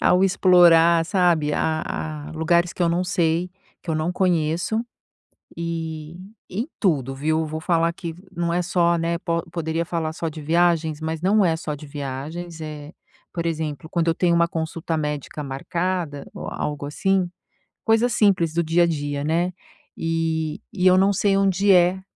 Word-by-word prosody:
ao 180 +1 +4
explorar, 170 -3 +5
sabe, 170 -4 +2
a 155 0 0 0.5
a - - -9
lugares 170 +2 +1
que 180 - -3
eu 170 - +3
não 170 +2 +1
sei, 175 0 0 0.3
que 170 - -5
eu - - +1
não 155 +3 -1
conheço. 180 +4 +1 0.8
E 165 -1 -4 0.3
em 225 +8 -3
tudo, 135 - +1
viu? 155 +3 0
Vou 155 +1 -5
falar 165 0 +2
que 170 -1 -6 0.2
não 170 -2 -1
é 175 - +1
só, 170 -1 +2
né, 170 +1 -1
po 170 -1 -1
poderia 165 0 -2
falar 160 -2 -2
só 165 0 -3
de 155 0 -9
viagens, 160 -1 +1
mas 160 0 -3
não 200 +3 +3
é 165 -2 +2
só 160 -2 -4
de 150 +1 -11
viagens. 150 +5 -6
Eh, 150 0 -7 0.4
por 170 -1 -3
exemplo, 160 -2 -3
quando 170 -1 0
eu 165 - +1
tenho 170 0 +2
uma 170 0 +3
consulta 165 0 -3
médica 150 0 -4
marcada 150 +2 -3
ou - - -7
algo 145 -1 -4
assim, 185 +5 0 0.6
coisa 225 +2 +3
simples 190 -8 +2
do 170 - +2
dia 165 +2 +3
a - - +3
dia, 145 -3 -2
né? 170 +4 +1 0.4
E 160 -1 -1
e 185 -3 0
eu 185 0 +7
não 195 +1 +4
sei 200 0 +2
onde 195 +1 +2
é, 180 +1 +4
165 Hz, 175 wpm, -23 LUFS, 155-180 Hz, 0.8 s, eu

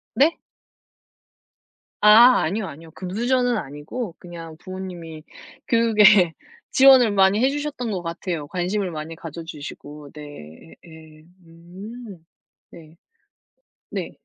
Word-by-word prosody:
네? 300 +5 +3 1.6
아 230 +4 +7
아니요, 195 +5 -2
아니요. 160 +1 -12
금수저는 240 +8 -1
아니고 165 - -6
그냥 165 -3 -10
부모님이 175 -4 -9 0.4
교육에 210 -6 +5 0.4
지원을 260 -4 +6
많이 195 +1 +3
해 265 - +4
주셨던 290 -4 -4
것 185 -3 -4
같아요, 165 -2 -4
관심을 185 +3 -2
많이 155 +1 -7
가져 165 0 -9
주시고. 150 -2 -10
네. 80 - -12
예예. 160 -2 -15 0.2
음. 185 +4 -12 0.5
네. 160 -1 -15 1.0
네. - - -4
180 Hz, 225 characters per minute, -22 LUFS, 160-220 Hz, 1.6 s, 아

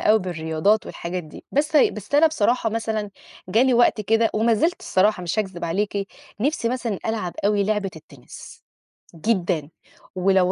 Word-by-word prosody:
أوي 220 +1 +4
بالرياضات 175 +3 0
والحاجات 180 +1 -5
دي، 155 - -13
بس 300 +2 +1
ه - - +6
بس 215 +6 -7
أنا 315 +3 +6
بصراحة 240 -5 +1
مثلًا 220 -2 -2 0.4
جالي 245 +5 +3
وقت 240 -2 +4
كده 225 +2 +2
ومازِلت 230 +10 +2
الصراحة 190 0 +1
مش 175 +5 -2
هاكذب 190 -5 -2
عليكِ، 200 +3 -2 0.3
نِفْسي 270 -3 0
مثلًا 235 -5 -2
ألعب 215 -6 -2
أوي 205 -1 +2
لعبة 210 -2 -1
التِنِس، 140 -4 -13 0.5
جدًا. 170 -5 -1 0.5
ولو 185 0 +3
210 Hz, 150 wpm, -23 LUFS, 180-230 Hz, 0.5 s, ه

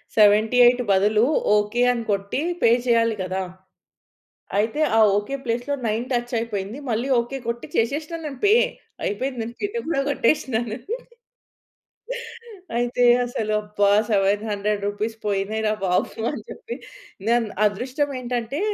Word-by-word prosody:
78 225 +4 +5
బదులు 210 +3 +4 0.3
ఓకే. 210 +4 0
అని 235 -2 -2
కొట్టి 200 +6 -1 0.2
పే - - +5 0.2
చేయాలి 230 -2 +3
గదా! 185 +1 -2 1.2
అయితే 225 +8 0 0.2
ఆ - - +5 0.2
ఓకే 210 +7 -2
ప్లేస్‌లో 245 +4 -1
9 220 +2 0
టచ్ 240 0 -1
అయిపోయింది 220 +1 -4
మళ్ళీ 235 +5 -1
ఓకే 240 +3 -5
కొట్టి 235 0 -3
చేషేష్న 300 +8 0
నేను 280 -4 -6
పే. 415 - +6 0.5
అయిపోయింది 250 +4 -2
నేను 230 +1 -6
కేట్ 410 +3 -2
గూడా 300 -4 +1
గొట్టేష్నాను. 240 -5 0 2.0
అయితే 245 +1 +1 0.2
అసలు 220 -3 -2
అబ్బా! 205 -1 +1 0.2
700 205 0 +1
రూపీస్ 215 +2 -3
పోయినాయి 205 +2 -1
రా - - +2
బాబు 185 +5 0
అని 290 - -6
చెప్పి 465 - -7 0.5
నే‌న్ 235 -1 +3 0.2
అదృష్టం 255 +8 -1
ఏంటంటే 245 +3 -3
230 Hz, 125 wpm, -23 LUFS, 210-245 Hz, 2.0 s, పే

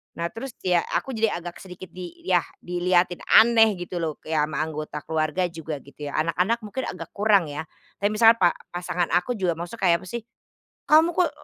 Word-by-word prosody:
Nah 170 0 -2
terus 255 +2 -7
ya 180 -2 +3 0.2
aku 270 - -1
jadi 225 -3 +1
agak 175 0 -7
sedikit 185 0 -10
di 180 -2 -10
yah 180 -2 +3 0.2
dilihatin 175 0 +1
aneh 225 -2 +6
gitu 175 0 -6
loh 155 -2 -3
kayak 155 -1 0
ama 150 -1 -4
anggota 155 -1 -5
keluarga 160 +3 0
juga 160 -4 -6
gitu 145 +1 -9
ya, - - -5
anak-anak 175 +8 +1
mungkin 240 +5 -4
agak 165 -3 -7
kurang 200 -7 +2
ya, 150 +2 -4 0.4
tapi 200 - +2
misalnya 225 +1 +5
pa 175 -2 +4 0.2
pasangan 175 0 -2
aku 235 +8 +1
juga 185 -4 0
maksudnya 175 +8 -7
kayak 170 - +5
apa - - -11
sih, 235 -2 -5 0.7
"Kamu 320 +3 +6
kok 345 -3 +2
180 Hz, 195 wpm, -24 LUFS, 165-215 Hz, 0.7 s, aneh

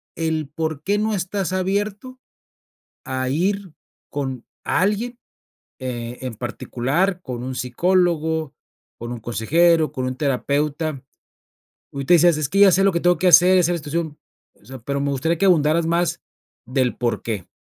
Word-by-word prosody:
el 160 -3 -2
por 155 -1 -4
qué 200 +4 +1
no 220 0 0
estás 185 0 -2
abierto 205 +7 -2 0.9
a 130 -1 -2
ir 190 +4 -1 0.4
con 135 -4 -4 0.2
alguien, 220 +6 0 0.6
eh, 120 -1 -5
en 130 -3 -4
particular 135 - -1
con 125 -5 -6
un 130 0 -4
psicólogo, 160 +2 0 0.4
con 120 +1 -6
un 120 - -6
consejero, 155 - +2
con 130 -1 -3
un 130 - -3
terapeuta 145 +1 -1 0.9
ahorita 140 +5 +2
decías: 170 -1 +5
"Es 150 -3 -1
que 195 +6 +1
ya 200 -1 +8
sé, 195 +3 +3
lo 195 - +4
que 170 - 0
tengo 175 -2 +3
que 185 - 0
hacer, 180 +1 +7
ya 180 - +5
sé, 175 - +1
la 175 - -1
situación", 155 0 -4 0.4
o - - -26
sea, 130 +1 -9
pero, 140 +4 -3
me 140 0 0
gustaría 155 +5 0
que 195 - +2
ahondaras, 160 -2 +3
más 170 0 0 0.5
del 130 0 0
por 120 -1 -1
qué. 105 -6 -4
160 Hz, 165 wpm, -21 LUFS, 130-180 Hz, 0.9 s, ya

